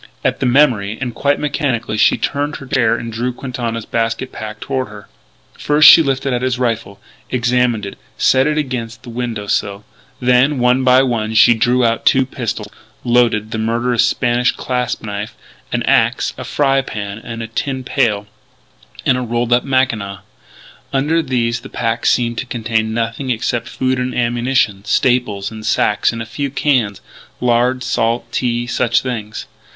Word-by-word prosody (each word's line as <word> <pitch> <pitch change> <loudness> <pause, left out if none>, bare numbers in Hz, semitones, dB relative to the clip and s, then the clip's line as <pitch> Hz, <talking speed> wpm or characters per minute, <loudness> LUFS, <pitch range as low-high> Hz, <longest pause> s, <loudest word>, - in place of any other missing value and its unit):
At - - 0
the - - 0
memory, 120 -6 +3
and 125 -3 -3
quite 140 +3 +1
mechanically, 140 -7 -1
she - - +4
turned 145 +1 -2
in - - -7
her - - -8
chair 125 -3 +2
and 115 -1 -6
drew 120 +3 -1
Quintana's 120 -3 -4
basket 115 +3 -2
pack 110 0 -7
toward 130 0 -2
her. 105 -1 -12 0.5
First 150 +1 +5
she 165 - +10
lifted 135 -2 -1
out 120 - -1
his 130 -1 0
rifle, 115 -5 -2 0.3
examined 125 -3 +1
it, 100 - -8 0.2
set 130 +2 +3
it 150 0 0
against 125 -5 -4
the 120 - -9
window 115 -3 -4
sill. 100 0 -2 0.3
Then, 125 +3 +3
one 125 +1 +2
by 130 +1 +5
one, 110 -4 -1
she 115 +2 +7
drew 120 +2 +2
out 115 0 0
two 130 0 +4
pistols, 115 -5 -4 0.4
loaded; 120 -3 +2
the 110 - -3
murderous 115 +2 +1
Spanish 120 +1 +1
clasp 125 -1 -3
knife; 105 0 -5 0.4
an - - -1
axe; - - +2
a - - -7
fry 135 -2 +2
pan 100 -5 -6
and 115 0 -7
a - - -5
tin 130 +3 -3
pail, 115 -6 0 0.8
and 125 - +3
the - - -2
rolled 120 0 0
up 120 - +3
mackinaw. 115 -8 -1 0.7
Under 150 +4 +1
these 120 -5 -1
the - - -11
pack 115 -1 -1
seemed 120 -1 +1
to - - -4
contain 110 -1 -1
nothing 115 +4 -3
except 120 0 -1
food 130 0 -1
and 125 0 -2
ammunition; 120 -4 0
staples 110 -5 0
in 110 -1 -8
sacks 105 -1 +1
and 115 -1 -5
a - - -9
few 140 +5 -4
cans 130 -7 0 0.4
lard, 125 +1 +1
salt, 115 0 -1
tea 120 -1 -1
such 120 -1 +1
things. 110 -5 -5
120 Hz, 170 wpm, -17 LUFS, 115-130 Hz, 0.8 s, she